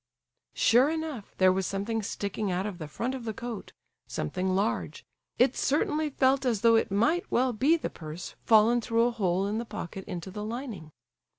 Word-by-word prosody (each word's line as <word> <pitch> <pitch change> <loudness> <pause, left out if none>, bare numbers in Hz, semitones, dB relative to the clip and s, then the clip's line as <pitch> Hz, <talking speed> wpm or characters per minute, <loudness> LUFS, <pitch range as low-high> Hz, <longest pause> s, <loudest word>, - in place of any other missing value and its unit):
Sure 250 +5 +5
enough 315 -9 -4
there 185 -1 +5
was 190 -1 -1
something 210 +3 -2
sticking 200 0 -3
out 180 +2 -1
of 195 -4 -5
the 155 - -5
front 235 - -3
of 260 -2 -5
the 220 -2 -4
coat—something 190 - -5
large. 195 +4 -1 0.3
It 250 +1 +4
certainly 300 +2 +1
felt 270 0 +2
as 235 -6 0
though 230 -1 +6
it 225 - +2
might 315 - +1
well 255 0 +2
be 280 +10 +3
the - - -4
purse 155 +2 -8
fallen 225 +2 +5
through 230 +1 +2
a 240 - +2
hole 190 -4 0
in 210 +2 -1
the - - -2
pocket 200 -4 -7
into 185 -1 -6
the 210 +2 -5
lining. 220 - -6
220 Hz, 185 wpm, -28 LUFS, 195-250 Hz, 0.3 s, though